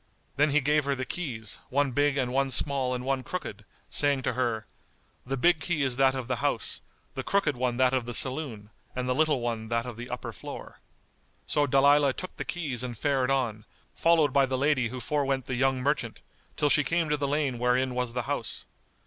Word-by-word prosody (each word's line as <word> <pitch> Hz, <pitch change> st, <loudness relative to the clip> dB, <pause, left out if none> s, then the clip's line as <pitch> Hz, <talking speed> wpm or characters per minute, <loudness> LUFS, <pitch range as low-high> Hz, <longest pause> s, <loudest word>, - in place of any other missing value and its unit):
Then 145 Hz, +2 st, +3 dB
he 150 Hz, +2 st, +3 dB
gave 150 Hz, +1 st, +2 dB
her 140 Hz, 0 st, +1 dB
the 130 Hz, 0 st, -3 dB
keys, 120 Hz, -10 st, -4 dB
one 140 Hz, 0 st, +1 dB
big 145 Hz, +2 st, +2 dB
and 125 Hz, -2 st, 0 dB
one 135 Hz, 0 st, +2 dB
small 130 Hz, -1 st, +1 dB
and 125 Hz, 0 st, -5 dB
one 135 Hz, -1 st, 0 dB
crooked, 115 Hz, -, -6 dB, 0.2 s
saying 140 Hz, -2 st, +2 dB
to 125 Hz, -, 0 dB
her 115 Hz, -3 st, -1 dB, 0.6 s
"The 135 Hz, +1 st, -1 dB
big 170 Hz, +4 st, +4 dB
key 155 Hz, -1 st, -1 dB
is 130 Hz, -3 st, +1 dB
that 135 Hz, 0 st, +4 dB
of 130 Hz, -3 st, -4 dB
the 125 Hz, -1 st, -1 dB
house, -, -, -1 dB, 0.3 s
the -, -, -3 dB
crooked 195 Hz, -8 st, +1 dB
one 125 Hz, -1 st, -1 dB
that 130 Hz, 0 st, +3 dB
of 125 Hz, -3 st, 0 dB
the 120 Hz, -, -3 dB
saloon 130 Hz, -6 st, -2 dB, 0.2 s
and 125 Hz, 0 st, -2 dB
the 125 Hz, -, +2 dB
little 150 Hz, -2 st, +2 dB
one 115 Hz, -2 st, -3 dB
that 115 Hz, 0 st, 0 dB
of 120 Hz, -3 st, -7 dB
the 120 Hz, +1 st, -7 dB
upper 125 Hz, -, -5 dB
floor." -, -, -9 dB, 0.7 s
So 145 Hz, -1 st, +1 dB
Dalilah 140 Hz, +1 st, +5 dB
took 185 Hz, -, -7 dB
the -, -, -4 dB
keys 140 Hz, -9 st, -3 dB
and 120 Hz, -3 st, -5 dB
fared 135 Hz, -1 st, +1 dB
on, 120 Hz, -6 st, 0 dB, 0.3 s
followed 160 Hz, -5 st, +3 dB
by 140 Hz, -1 st, +4 dB
the 130 Hz, 0 st, -1 dB
lady 135 Hz, -2 st, +2 dB
who 125 Hz, +2 st, -6 dB
forwent 135 Hz, 0 st, 0 dB
the 130 Hz, -, -4 dB
young 130 Hz, +1 st, +1 dB
merchant, 130 Hz, -5 st, -1 dB, 0.4 s
till 145 Hz, -, +2 dB
she 145 Hz, +1 st, +5 dB
came 165 Hz, +2 st, +1 dB
to 150 Hz, -, +2 dB
the 140 Hz, -1 st, -1 dB
lane 140 Hz, -4 st, 0 dB
wherein 125 Hz, +1 st, +2 dB
was 125 Hz, -1 st, -2 dB
the 125 Hz, 0 st, -2 dB
house. -, -, -3 dB
130 Hz, 215 wpm, -28 LUFS, 125-145 Hz, 0.7 s, Dalilah